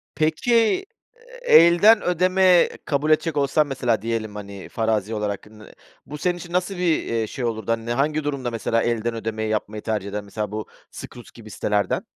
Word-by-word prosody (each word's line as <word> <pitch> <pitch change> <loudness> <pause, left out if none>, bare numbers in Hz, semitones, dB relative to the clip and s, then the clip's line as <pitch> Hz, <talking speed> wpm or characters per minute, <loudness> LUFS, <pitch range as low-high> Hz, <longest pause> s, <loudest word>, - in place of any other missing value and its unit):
Peki, 230 - +2 0.3
ııı, - - -16
elden 205 - +6
ödeme 185 0 +3 0.2
kabul 150 +1 0
edecek 155 -1 +1
olsan 145 +2 +2
mesela, 125 -6 -1
diyelim, 110 -2 -3
hani, 100 -2 -9
farazi 110 -2 -1
olarak 105 -2 -3
nı 105 -1 -15 0.3
bu 150 - -8
senin 175 +3 -1
için 175 0 -10
nasıl 180 +1 -1
bir, 175 -3 +1
eee, 115 -1 -1
şey 125 +3 -5
olurdu? 110 -1 -2
Hani, 115 0 -2
ne, 120 - -1
hangi 150 +4 0
durumda 140 -4 -3
mesela 115 0 0
elden 115 0 -1
ödemeyi 110 -1 -3
yapmayı 105 0 -3
tercih 105 -3 -3
eden 105 0 -4
mesela 105 0 -5
bu 110 0 -5 0.2
Skroutz 120 - -11
gibi 110 -2 -13
sitelerden? 105 -1 -1
120 Hz, 175 wpm, -22 LUFS, 110-170 Hz, 0.3 s, elden